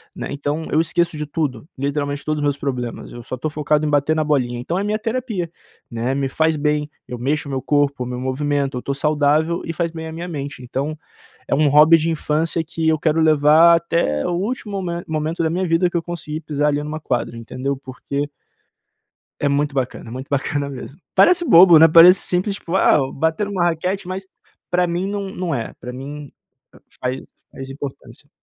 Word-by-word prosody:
né, - - -5
então 145 +3 -3
eu 155 - +3
esqueço 170 0 0
de 150 - -3
tudo, 145 -6 -3
literalmente 145 +1 -2
todos 155 0 -1
os - - -2
meus 145 -1 +1
problemas, 125 -4 -4
eu 120 - -9
só 130 - -6
tô 155 - -3
focado 150 0 0
em - - 0
bater 145 +1 +2
na 155 - +1
bolinha. 125 -5 0
Então 165 +8 -3
é - - -1
minha 210 +1 -1
terapia, 225 -6 -3 0.4
né, 120 +3 -1
me 140 -1 0
faz 160 +3 +1
bem. 150 0 0 0.2
Eu 125 - -6
mexo 145 +4 -1
o - - -5
meu 135 -1 -2
corpo, 140 -1 +1
me 125 0 -5
movimento, 140 +1 -1
eu - - -4
tô 140 - -2
saudável, 150 +3 +1
e 165 - -3
faz 170 +1 -1
bem 160 -1 -7
a - - -6
minha 170 +2 -6
mente. 140 -5 -6
Então 140 +5 -3 0.5
é - - +1
um 150 +1 +3
hobby 150 +3 +7
de 160 +1 -1
infância, 160 +1 -1
que 160 0 -2
eu 160 0 +3
quero 155 +1 +1
levar 155 +2 +6
até 165 - 0
o - - -1
último 200 +2 -3
mome 170 -1 -3
momento 160 +2 -2
da 160 - +1
minha 185 +3 -1
vida 165 +2 +2
que 175 - -3
eu 170 - 0
conseguir 160 -2 -6
pisar 150 -1 0
ali 145 0 0
numa 155 +1 -5
quadra 125 -4 -2
entendeu, 130 +4 -4
porque 140 +2 -5 1.1
é 145 - +1
muito 145 +1 0
bacana, 125 -4 -3
muito 130 +3 -7
bacana 140 0 -1
mesmo. 135 +3 -9 0.2
Parece 360 -1 +5
bobo, 170 - +8
né, 165 - +9
parece 170 +4 +8
simples 185 +3 -1
tipo, 180 -2 -5
ah 190 - +5
bater 160 +7 0
numa 195 -3 -1
raquete 180 +3 -1
mas, 190 +1 -5 0.4
pra 180 0 +2
mim 175 +3 -2
não 200 -1 -3
não 180 -4 -3
é, 115 -3 -4
pra 125 +1 -7
mim 140 +2 -8 0.7
faz 130 +1 -2 0.3
faz 135 0 -9
importância. 135 0 -9
150 Hz, 205 wpm, -20 LUFS, 140-170 Hz, 1.1 s, né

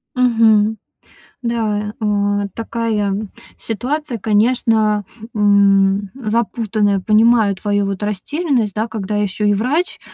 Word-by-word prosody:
Мгм. 225 -3 +3 0.6
Да, 215 -3 -2
э, 205 -1 0
такая, 225 -2 -2
м, 200 +1 -3 0.3
ситуация, 255 +4 -3
конечно, 215 0 +1 0.3
м, 200 -1 +3
запутанная. 215 -4 0
Понимаю 215 0 +3
твою 205 +1 -1
вот 195 0 -4
растерянность, 225 - -1
да, 220 +2 -2
когда 210 -2 -4
ещё 210 +1 -1
и 205 - +3
врач, 260 - -1
215 Hz, 105 wpm, -18 LUFS, 205-230 Hz, 0.6 s, Мгм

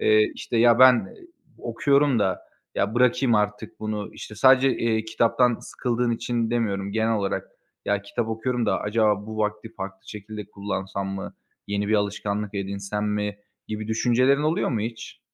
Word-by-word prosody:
eee, 435 -4 +4
işte, 120 - -4
ya, 120 0 +5
ben 130 0 +9
ı 105 -5 -4 0.4
okuyorum 140 +2 +2
da, 95 -3 0 0.3
ya, 100 +3 0
bırakayım 125 0 +3
artık 105 0 -1
bunu, 105 -1 -3
işte, 105 - -9
sadece, 130 +3 +5
eee, 110 -1 0
kitaptan 115 +2 +2
sıkıldığın 120 -1 -1
için 115 0 -1
demiyorum 100 -4 -1
genel 110 +1 +1
olarak. 100 -2 -2 0.4
Ya, 100 0 0
kitap 110 +3 -3
okuyorum 115 +2 -1
da - - +1
acaba 105 -1 +1
bu 110 0 -6
vakti 105 +1 -2
farklı 95 -1 -8
şekilde 105 0 -7
kullansam 100 -1 -4
mı, 95 0 -6 0.3
yeni 100 0 -1
bir 110 - +3
alışkanlık 105 0 -1
edinsem 100 +1 -3
mi 105 -1 -2 0.3
gibi 110 0 -4
düşüncelerin 125 +5 +3
oluyor 160 +2 +1
mu 115 -4 -1
hiç? 115 +1 -6
110 Hz, 160 wpm, -24 LUFS, 105-120 Hz, 0.4 s, ben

